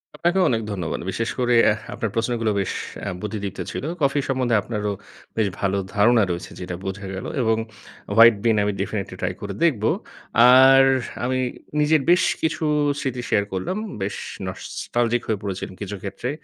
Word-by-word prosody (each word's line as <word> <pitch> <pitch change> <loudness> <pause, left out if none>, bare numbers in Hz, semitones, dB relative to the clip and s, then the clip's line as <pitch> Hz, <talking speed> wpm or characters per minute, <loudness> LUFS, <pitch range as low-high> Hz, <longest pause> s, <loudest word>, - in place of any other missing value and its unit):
আপনাকেও 180 +2 +2
অনেক 115 -2 +1
ধন্যবাদ। 90 -5 -3
বিশেষ 115 +4 -2
করে 125 -1 +2 0.2
এহ 105 - -2
আপনার 115 - -2
প্রশ্নগুলো 115 -1 0
বেশ - - -2 0.3
অ্যা 100 - -3
বুদ্ধিদীপ্ত 100 -2 -5
ছিল। - - -5 0.2
কফি 140 0 +2
সম্বন্ধে 125 -3 +1
আপনারও 105 -1 -3 0.5
বেশ 110 -2 +2
ভালো 100 0 0 0.2
ধারণা 110 +2 +5
রয়েছে, 85 +1 -5
যেটা 90 0 -5
বোঝা 95 +1 -5
গেলো 95 - -5
এবং 110 -2 +2 0.6
হোয়াইট 115 -1 +9
বিন 115 -2 +3
আমি 105 - +1
ডেফিনিটলি - - -3
ট্রাই - - -1
করে - - -4
দেখব। 130 -11 +2 0.7
আর 135 +1 +8 0.4
আমি 130 +1 0 0.4
নিজের 150 0 +4
বেশ 180 +1 +5 0.2
কিছু 160 0 -1 0.4
স্মৃতি 130 -3 -3
শেয়ার 100 - +3
করলাম। 95 - -2 0.2
বেশ 95 +1 -2 0.3
নস্টালজিক 120 +5 -2
হয়ে 110 - 0
পড়েছি 95 -1 -4 0.2
কিছু 100 0 -4
ক্ষেত্রে। 100 +5 -4
115 Hz, 160 wpm, -23 LUFS, 100-130 Hz, 0.7 s, হোয়াইট